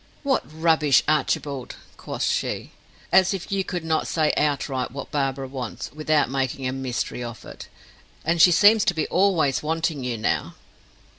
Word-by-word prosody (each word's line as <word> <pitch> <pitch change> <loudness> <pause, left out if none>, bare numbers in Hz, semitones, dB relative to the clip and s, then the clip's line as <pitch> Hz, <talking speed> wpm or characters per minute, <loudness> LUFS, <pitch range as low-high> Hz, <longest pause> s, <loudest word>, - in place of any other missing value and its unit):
"What 275 -2 +2
rubbish 160 -3 +3
Archibald!" 145 -3 -1 0.2
quoth - - -5
she. - - -1 0.4
"As 190 +1 +4
if 190 - -8
you 195 -1 0
could 180 -3 -4
not 160 -1 0
say 155 -2 +1
outright 140 -3 0
what 140 +3 -8
Barbara 135 -2 -1
wants, 130 -3 -6
without 155 0 +1
making 135 0 -2
a - - -1
mystery 130 -2 -3
of 120 -1 -8
it. - - -10 0.6
And 165 +1 +2
she 180 - +8
seems 205 +5 +6
to 180 - +1
be 160 - 0
always 175 -8 +2
wanting 160 -2 -2
you 125 -2 -2
now." 110 - -1
150 Hz, 160 wpm, -24 LUFS, 135-170 Hz, 0.6 s, she